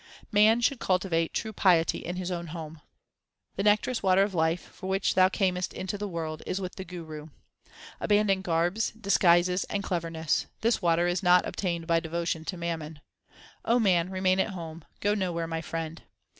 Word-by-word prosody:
Man 215 Hz, +2 st, +5 dB
should 245 Hz, +2 st, +1 dB
cultivate 180 Hz, -3 st, 0 dB
true 220 Hz, -1 st, -3 dB
piety 175 Hz, -5 st, +3 dB
in 175 Hz, -, -5 dB
his 185 Hz, 0 st, -4 dB
own 170 Hz, -1 st, -4 dB
home: 160 Hz, -1 st, -8 dB, 0.7 s
The -, -, -2 dB
nectareous 210 Hz, +4 st, +2 dB
water 190 Hz, 0 st, +4 dB
of 200 Hz, -1 st, -2 dB
life, 160 Hz, 0 st, +1 dB
1 -, -, -20 dB
for 185 Hz, -, -8 dB
which 195 Hz, +1 st, +1 dB
thou 185 Hz, 0 st, +5 dB
earnest 185 Hz, -2 st, 0 dB
into 190 Hz, +2 st, -4 dB
the 205 Hz, 0 st, -4 dB
world, 160 Hz, -4 st, -4 dB
is 190 Hz, -, -2 dB
with 185 Hz, -2 st, -5 dB
the 190 Hz, -, -7 dB
Guru. 160 Hz, -4 st, -8 dB, 0.7 s
Abandon 205 Hz, -2 st, +2 dB
garbs, 175 Hz, +4 st, 0 dB
disguises, 180 Hz, -3 st, +3 dB
and 200 Hz, -1 st, -3 dB
cleverness; 165 Hz, -4 st, -1 dB
this 230 Hz, -1 st, +1 dB
water 170 Hz, -1 st, +2 dB
2 175 Hz, -, +2 dB
is 175 Hz, -, -1 dB
not 180 Hz, -1 st, +5 dB
obtained 170 Hz, -3 st, -3 dB
by 165 Hz, 0 st, +2 dB
devotion 165 Hz, 0 st, -3 dB
to 185 Hz, -, -4 dB
mammon. 160 Hz, -3 st, -5 dB, 0.6 s
O 235 Hz, -, +3 dB
man, 180 Hz, -5 st, +2 dB
remain 185 Hz, 0 st, +1 dB
at 190 Hz, -, +1 dB
home; 165 Hz, -2 st, -8 dB, 0.2 s
go 205 Hz, 0 st, +2 dB
nowhere, 180 Hz, -5 st, -1 dB
my 165 Hz, 0 st, -3 dB
friend. 165 Hz, 0 st, -5 dB
180 Hz, 185 wpm, -28 LUFS, 165-195 Hz, 0.7 s, Man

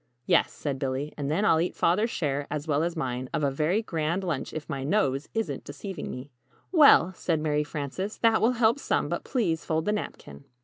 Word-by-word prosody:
"Yes," -, -, +3 dB
said 140 Hz, -3 st, -4 dB
Billy, 135 Hz, +2 st, -2 dB
"and 140 Hz, -2 st, -3 dB
then 170 Hz, +8 st, +1 dB
I'll 160 Hz, -6 st, +4 dB
eat 175 Hz, -, -2 dB
Father's 210 Hz, +7 st, +2 dB
share, 145 Hz, -7 st, -2 dB
as 150 Hz, +1 st, -4 dB
well 145 Hz, -1 st, +2 dB
as 170 Hz, +1 st, -1 dB
mine, 125 Hz, -4 st, -3 dB
of 150 Hz, -, -1 dB
a 140 Hz, -, +2 dB
very 160 Hz, +10 st, +1 dB
'grand' 165 Hz, 0 st, -1 dB
lunch 165 Hz, -7 st, -3 dB
if 155 Hz, -1 st, -6 dB
my 140 Hz, -4 st, -4 dB
nose 140 Hz, -4 st, 0 dB
isn't 170 Hz, -12 st, -2 dB
deceiving 170 Hz, +6 st, -7 dB
me." 130 Hz, +3 st, -7 dB, 0.4 s
"Well," 290 Hz, -, +6 dB
said 165 Hz, -2 st, -1 dB
Mary 150 Hz, -1 st, +1 dB
Frances, 150 Hz, +7 st, -4 dB
"that 225 Hz, -1 st, +3 dB
will 235 Hz, +3 st, +4 dB
help 235 Hz, +2 st, +3 dB
some; -, -, 0 dB
but -, -, -2 dB
please 185 Hz, -, -1 dB
fold 160 Hz, 0 st, -1 dB
the 210 Hz, -, +1 dB
napkin." 70 Hz, -, -6 dB
160 Hz, 210 wpm, -27 LUFS, 140-195 Hz, 0.4 s, Well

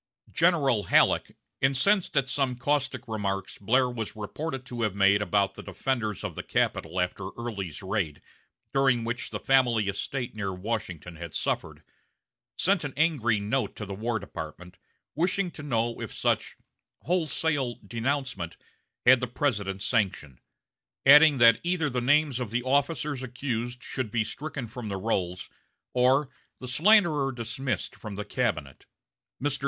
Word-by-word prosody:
General 140 Hz, -, +3 dB
Halleck, -, -, +3 dB, 0.2 s
incensed 145 Hz, +7 st, +2 dB
at 135 Hz, -1 st, +3 dB
some 135 Hz, -1 st, 0 dB
caustic 145 Hz, +2 st, -1 dB
remarks 100 Hz, -3 st, -3 dB
Blair 125 Hz, +6 st, +3 dB
was 115 Hz, -3 st, -5 dB
reported 135 Hz, +5 st, -5 dB
to 120 Hz, -2 st, -5 dB
have 105 Hz, -4 st, 0 dB
made 100 Hz, +1 st, +4 dB
about 100 Hz, -1 st, +1 dB
the -, -, -9 dB
defenders 110 Hz, -7 st, -2 dB
of -, -, -3 dB
the -, -, -5 dB
capital 95 Hz, -, -1 dB
after 90 Hz, +1 st, -2 dB
Early's 100 Hz, -8 st, -5 dB
raid, 95 Hz, -6 st, -2 dB, 0.5 s
during 135 Hz, -4 st, +3 dB
which 120 Hz, +3 st, -3 dB
the -, -, -4 dB
family 120 Hz, -6 st, +3 dB
estate 120 Hz, +5 st, -3 dB
near 100 Hz, -3 st, -3 dB
Washington 90 Hz, -5 st, -4 dB
had 85 Hz, -1 st, -8 dB
suffered, -, -, -2 dB, 0.7 s
sent 190 Hz, -1 st, +2 dB
an 145 Hz, -2 st, -5 dB
angry 135 Hz, -9 st, +2 dB
note 110 Hz, +6 st, -1 dB
to 105 Hz, -, -6 dB
the 100 Hz, -, -6 dB
War 110 Hz, +3 st, -1 dB
Department, 90 Hz, -1 st, -8 dB, 0.3 s
wishing 180 Hz, +3 st, 0 dB
to 155 Hz, -, -10 dB
know 120 Hz, -5 st, -1 dB
if -, -, -5 dB
such -, -, -1 dB, 0.5 s
"wholesale 160 Hz, -7 st, 0 dB
denouncement" 115 Hz, -5 st, -2 dB, 0.5 s
had 130 Hz, +1 st, +8 dB
the 125 Hz, -, -2 dB
President's 105 Hz, -7 st, -1 dB
sanction; 95 Hz, -, -1 dB, 0.7 s
adding 150 Hz, +1 st, +8 dB
that 115 Hz, -2 st, +7 dB
either 170 Hz, -4 st, 0 dB
the 125 Hz, 0 st, -1 dB
names 145 Hz, 0 st, +3 dB
of 125 Hz, -4 st, -3 dB
the 120 Hz, +3 st, -1 dB
officers 145 Hz, +1 st, 0 dB
accused 125 Hz, -1 st, -4 dB
should 130 Hz, -5 st, -3 dB
be 115 Hz, 0 st, +1 dB
stricken 135 Hz, +1 st, -5 dB
from 120 Hz, 0 st, -7 dB
the 100 Hz, -, -2 dB
rolls, 95 Hz, -3 st, -2 dB, 0.5 s
or 130 Hz, +3 st, +3 dB, 0.3 s
the 130 Hz, -, -7 dB
"slanderer 155 Hz, -, +4 dB
dismissed 120 Hz, +2 st, -3 dB
from 105 Hz, -3 st, -8 dB
the 105 Hz, +1 st, -5 dB
cabinet." 100 Hz, -, -2 dB, 0.5 s
Mr. 145 Hz, 0 st, -1 dB
120 Hz, 150 wpm, -27 LUFS, 105-135 Hz, 0.7 s, had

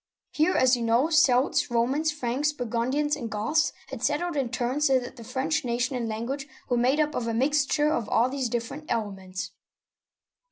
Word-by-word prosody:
Here, 315 Hz, +4 st, +2 dB
as 255 Hz, 0 st, +5 dB
you 240 Hz, -, -4 dB
know, 235 Hz, +7 st, +2 dB
Celts, 275 Hz, -6 st, +3 dB
Romans, 260 Hz, +7 st, +1 dB
Franks, 290 Hz, +1 st, -1 dB
Burgundians, 260 Hz, +3 st, -1 dB
and 235 Hz, -5 st, -5 dB
Goths 225 Hz, +10 st, +1 dB, 0.2 s
had -, -, -7 dB
settled 350 Hz, -2 st, 0 dB
in 270 Hz, -4 st, 0 dB
turn, 250 Hz, +5 st, -2 dB
so 270 Hz, -3 st, +4 dB
that 245 Hz, 0 st, -5 dB
the 235 Hz, -, -10 dB
French 280 Hz, +7 st, -1 dB
nation 245 Hz, +3 st, -1 dB
and 235 Hz, -2 st, -2 dB
language 255 Hz, +6 st, -4 dB, 0.2 s
were 245 Hz, -, +2 dB
made 255 Hz, +5 st, +2 dB
up 300 Hz, -1 st, +1 dB
of 230 Hz, -, -2 dB
a 230 Hz, -, -1 dB
mixture 295 Hz, +3 st, +2 dB
of 230 Hz, -7 st, -2 dB
all 235 Hz, +2 st, +3 dB
these 260 Hz, -2 st, -2 dB
dif 235 Hz, 0 st, -2 dB
ferent 305 Hz, +5 st, -9 dB
elements. 195 Hz, -5 st, -4 dB
255 Hz, 190 wpm, -26 LUFS, 235-295 Hz, 0.2 s, as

